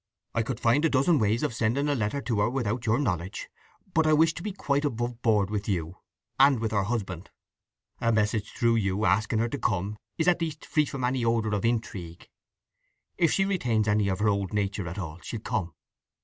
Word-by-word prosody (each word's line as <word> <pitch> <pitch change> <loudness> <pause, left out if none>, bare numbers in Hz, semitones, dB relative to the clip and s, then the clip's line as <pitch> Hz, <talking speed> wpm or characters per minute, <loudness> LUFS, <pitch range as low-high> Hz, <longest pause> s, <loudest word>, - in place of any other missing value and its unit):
I 115 - +1
could 120 +1 -3
find 125 +5 +3
a 160 - +4
dozen 140 +3 +3
ways 110 +1 +1
of - - 0
sending 120 +6 0
a 145 - +2
letter 120 +2 -1
to 115 -6 -1
her 105 +3 +3
without 120 -2 -2
your 110 +2 +3
knowledge. 95 - -3 0.4
But 160 0 +3
I 155 - +4
wish 160 +1 +4
to - - -7
be 210 - -3
quite 145 -7 -1
above 120 -3 -2
board 105 -3 +2
with 105 0 -2
you, 85 -2 -2 0.4
and 135 -2 +6
with 110 -1 -2
her 100 -3 +1
husband. 100 -6 -3 0.7
A 115 - +2
message 105 -1 +1
through 115 -1 +2
you 100 0 0
asking 110 +2 +2
her 115 +2 +1
to 140 - -4
come 105 -1 -1 0.2
is 160 - 0
at 175 -1 +3
least 160 -2 -4
free 155 -2 +2
from 135 -2 -5
any 125 0 0
odour 115 -2 +1
of 105 +2 0
intrigue. 100 -7 -3 0.9
If 165 -3 +4
she 195 - +2
retains 125 - 0
any 105 -1 +2
of 95 -1 0
her 105 - +1
old 100 -1 -1
nature 100 -2 -1
at 85 +3 -6
all, 85 -3 -5
she'll 115 - -5
come." 100 -9 -3
115 Hz, 215 wpm, -27 LUFS, 105-135 Hz, 0.9 s, and